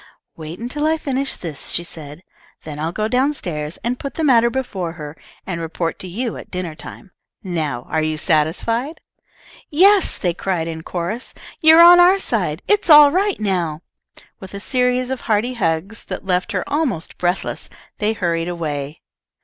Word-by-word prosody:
"Wait 160 Hz, +1 st, -8 dB
until 275 Hz, +6 st, -2 dB
I 320 Hz, 0 st, +2 dB
finish 275 Hz, -2 st, -2 dB
this," 160 Hz, -5 st, -4 dB
she 170 Hz, -, -1 dB
said. 155 Hz, -1 st, -10 dB, 0.4 s
"Then 150 Hz, -1 st, -7 dB
I'll 160 Hz, +2 st, -2 dB
go 215 Hz, +4 st, -2 dB
down 265 Hz, +6 st, +1 dB
stairs 150 Hz, -, -5 dB
and 245 Hz, +2 st, -2 dB
put 275 Hz, -, -6 dB
the 325 Hz, -, -2 dB
matter 235 Hz, -5 st, +5 dB
before 195 Hz, -10 st, -3 dB
her, 150 Hz, -3 st, -8 dB, 0.3 s
and 175 Hz, -3 st, -4 dB
report 165 Hz, 0 st, -3 dB
to 185 Hz, -, -6 dB
you 225 Hz, +6 st, -4 dB
at -, -, -11 dB
dinner 180 Hz, -3 st, -4 dB
time. 180 Hz, +5 st, -11 dB, 0.3 s
Now 155 Hz, -9 st, -3 dB
are 160 Hz, -, 0 dB
you 155 Hz, 0 st, -1 dB
satisfied?" 210 Hz, -, 0 dB, 0.7 s
"Yes," 385 Hz, +6 st, +5 dB
they 175 Hz, -3 st, -1 dB
cried 175 Hz, -2 st, -2 dB
in 160 Hz, -1 st, -5 dB
chorus, 180 Hz, +9 st, -5 dB, 0.3 s
"you're 320 Hz, +1 st, +8 dB
on 350 Hz, +1 st, +9 dB
our 360 Hz, +2 st, +6 dB
side. 185 Hz, -, -2 dB
It's 415 Hz, -3 st, +2 dB
all 295 Hz, -2 st, +9 dB
right 390 Hz, +4 st, 0 dB
now!" 175 Hz, -7 st, -1 dB, 0.6 s
With 190 Hz, +1 st, -10 dB
a -, -, -5 dB
series 250 Hz, +2 st, 0 dB
of 265 Hz, -, -3 dB
hearty 220 Hz, +4 st, 0 dB
hugs 195 Hz, 0 st, -2 dB
that -, -, -6 dB
left 185 Hz, +4 st, 0 dB
her 185 Hz, -, -2 dB
almost 285 Hz, -, -2 dB
breathless, 180 Hz, +1 st, -2 dB, 0.3 s
they 215 Hz, +1 st, +1 dB
hurried 170 Hz, -4 st, -1 dB
away. 150 Hz, -3 st, -5 dB
190 Hz, 175 wpm, -20 LUFS, 165-255 Hz, 0.7 s, on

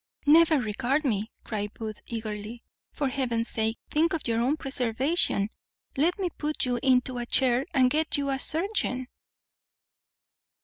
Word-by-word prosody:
"Never 315 Hz, +1 st, +6 dB
regard 255 Hz, +6 st, 0 dB
me," 215 Hz, -3 st, 0 dB
cried 210 Hz, -1 st, -4 dB
Booth 215 Hz, -2 st, -6 dB
eagerly; 220 Hz, 0 st, -5 dB, 0.3 s
"for 285 Hz, -, -1 dB
Heaven's 240 Hz, -3 st, 0 dB
sake, 220 Hz, 0 st, 0 dB
think 320 Hz, +2 st, +2 dB
of 320 Hz, -, -3 dB
your 230 Hz, 0 st, +1 dB
own 270 Hz, +6 st, +1 dB
preservation. 260 Hz, -, 0 dB, 0.4 s
Let 330 Hz, +7 st, +2 dB
me 380 Hz, -3 st, -1 dB
put 300 Hz, -1 st, -1 dB
you 245 Hz, -1 st, 0 dB
into 255 Hz, -1 st, +2 dB
a 240 Hz, -, -4 dB
chair, 255 Hz, +2 st, +2 dB
and 260 Hz, -5 st, +4 dB
get 315 Hz, 0 st, +1 dB
you 280 Hz, -1 st, -1 dB
a 270 Hz, -, -1 dB
surgeon." 315 Hz, -, -1 dB
255 Hz, 145 wpm, -27 LUFS, 230-300 Hz, 0.4 s, Never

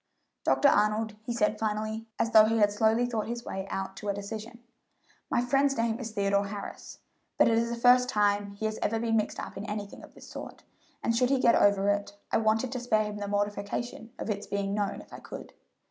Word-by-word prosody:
"Dr. 285 Hz, -, +4 dB
Arnold," 210 Hz, -1 st, +2 dB
he 230 Hz, -, -5 dB
said 215 Hz, -2 st, +1 dB
finally, 220 Hz, +1 st, -2 dB
as 230 Hz, -, 0 dB
though 215 Hz, -2 st, +8 dB
he 225 Hz, +1 st, +1 dB
had 205 Hz, -2 st, +4 dB
slowly 220 Hz, +3 st, +2 dB
thought 230 Hz, -3 st, -2 dB
his 235 Hz, +1 st, -5 dB
way 190 Hz, 0 st, -5 dB
out 195 Hz, 0 st, -4 dB
to 210 Hz, -, -5 dB
a 200 Hz, -, 0 dB
decision, 220 Hz, +4 st, -7 dB, 0.7 s
"my -, -, +2 dB
friend's 275 Hz, +2 st, +2 dB
name 230 Hz, 0 st, 0 dB
is 235 Hz, -3 st, -4 dB
Theodore 200 Hz, -1 st, +1 dB
Harris, 200 Hz, 0 st, -7 dB, 0.4 s
but -, -, +5 dB
it 230 Hz, -, +3 dB
is 230 Hz, +1 st, +1 dB
the 235 Hz, -, -2 dB
first 250 Hz, +1 st, +5 dB
time 205 Hz, -2 st, +1 dB
he 200 Hz, +2 st, -5 dB
has 215 Hz, 0 st, -2 dB
ever 225 Hz, +1 st, 0 dB
been 225 Hz, 0 st, 0 dB
mixed 215 Hz, -, -1 dB
up -, -, -7 dB
in 200 Hz, -, -5 dB
anything 205 Hz, -1 st, -6 dB
of -, -, -14 dB
this -, -, -13 dB
sort, -, -, -9 dB, 0.4 s
and 230 Hz, -, +1 dB
should 250 Hz, +1 st, +3 dB
he 270 Hz, -1 st, +3 dB
get 235 Hz, -2 st, +5 dB
over 200 Hz, -1 st, +4 dB
it, 205 Hz, 0 st, -1 dB
I -, -, +3 dB
wanted 225 Hz, +3 st, +1 dB
to 255 Hz, -, -3 dB
spare 220 Hz, -3 st, +2 dB
him 210 Hz, 0 st, -5 dB
the 205 Hz, -1 st, -4 dB
mortification 205 Hz, +3 st, -3 dB
of -, -, -3 dB
its 205 Hz, 0 st, -4 dB
being 200 Hz, 0 st, -2 dB
known 205 Hz, -1 st, -2 dB
if -, -, -17 dB
I -, -, -8 dB
could. -, -, -9 dB
215 Hz, 225 wpm, -29 LUFS, 205-235 Hz, 0.7 s, though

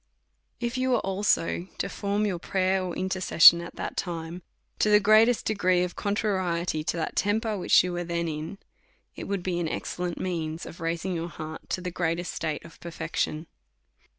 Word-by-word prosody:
If 240 Hz, +1 st, -2 dB
you 260 Hz, 0 st, +1 dB
was 250 Hz, -, +3 dB
also 190 Hz, -2 st, 0 dB
to -, -, -1 dB
form 205 Hz, +1 st, -1 dB
your 185 Hz, -4 st, -1 dB
prayer 190 Hz, +1 st, +1 dB
or 180 Hz, -2 st, -4 dB
in 185 Hz, -, -2 dB
tercession 170 Hz, -2 st, +7 dB
at 170 Hz, -, -9 dB
that -, -, -5 dB
time, 170 Hz, 0 st, -4 dB, 0.4 s
to 215 Hz, -, +3 dB
the 210 Hz, 0 st, +7 dB
greatest 215 Hz, +3 st, +4 dB
degree 185 Hz, -4 st, +2 dB
of 180 Hz, -, -4 dB
con 200 Hz, 0 st, -1 dB
trariety 180 Hz, -7 st, -1 dB
to 170 Hz, -, -2 dB
that 160 Hz, -, -3 dB
temper 215 Hz, +2 st, +1 dB
which 185 Hz, -, +4 dB
you 180 Hz, -1 st, -3 dB
was 175 Hz, -1 st, -3 dB
then 170 Hz, -1 st, -1 dB
in, 160 Hz, +4 st, -5 dB, 0.6 s
it -, -, -6 dB
would 195 Hz, -3 st, -3 dB
be 180 Hz, -2 st, -1 dB
an 165 Hz, -2 st, -1 dB
excellent 175 Hz, +1 st, -4 dB
means 165 Hz, -3 st, -3 dB
of 170 Hz, -, -10 dB
raising 165 Hz, +3 st, -2 dB
your 170 Hz, 0 st, -3 dB
heart 155 Hz, 0 st, -8 dB
to 185 Hz, -, -2 dB
the 180 Hz, 0 st, -4 dB
greatest 175 Hz, 0 st, -2 dB
state 155 Hz, -1 st, -3 dB
of 165 Hz, -, -14 dB
perfection. 160 Hz, -1 st, -3 dB
180 Hz, 190 wpm, -27 LUFS, 170-200 Hz, 0.6 s, tercession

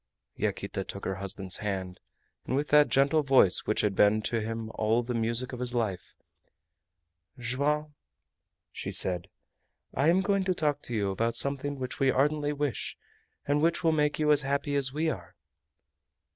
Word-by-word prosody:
Yaquita -, -, -3 dB
took -, -, -8 dB
her 95 Hz, -, -1 dB
husband's 95 Hz, -1 st, -3 dB
hand, 95 Hz, -3 st, -4 dB, 0.5 s
and -, -, 0 dB
with 145 Hz, +2 st, -1 dB
that 150 Hz, 0 st, +5 dB
gentle 140 Hz, +3 st, +3 dB
voice 135 Hz, -10 st, +4 dB
which 110 Hz, -, +1 dB
had 105 Hz, -2 st, 0 dB
been 105 Hz, +2 st, +4 dB
to 115 Hz, +1 st, -2 dB
him 110 Hz, 0 st, -4 dB
all 110 Hz, +2 st, +1 dB
the 125 Hz, +1 st, -4 dB
music 115 Hz, +3 st, -1 dB
of 125 Hz, -, -6 dB
his 125 Hz, -1 st, -2 dB
life: 105 Hz, -7 st, -3 dB, 1.2 s
"Joam," 145 Hz, +5 st, -1 dB, 0.8 s
she -, -, -5 dB
said, 90 Hz, -2 st, +2 dB, 0.6 s
"I 140 Hz, -, +1 dB
am 175 Hz, +3 st, +4 dB
going 200 Hz, 0 st, +1 dB
to 185 Hz, -1 st, +1 dB
talk 150 Hz, -4 st, 0 dB
to 120 Hz, -, -4 dB
you 100 Hz, -2 st, 0 dB
about 115 Hz, +4 st, -1 dB
something 140 Hz, +1 st, +1 dB
which 130 Hz, -1 st, -5 dB
we 135 Hz, -, +3 dB
ardently 145 Hz, +2 st, +1 dB
wish, 145 Hz, -4 st, -3 dB, 0.5 s
and 145 Hz, +1 st, +1 dB
which 170 Hz, +2 st, +1 dB
will 165 Hz, -, +4 dB
make 150 Hz, -1 st, +1 dB
you 150 Hz, -1 st, +2 dB
as 150 Hz, -1 st, +4 dB
happy 140 Hz, +1 st, -1 dB
as 135 Hz, -2 st, +2 dB
we 155 Hz, +4 st, -1 dB
are." 155 Hz, -, -5 dB
130 Hz, 170 wpm, -28 LUFS, 110-150 Hz, 1.2 s, that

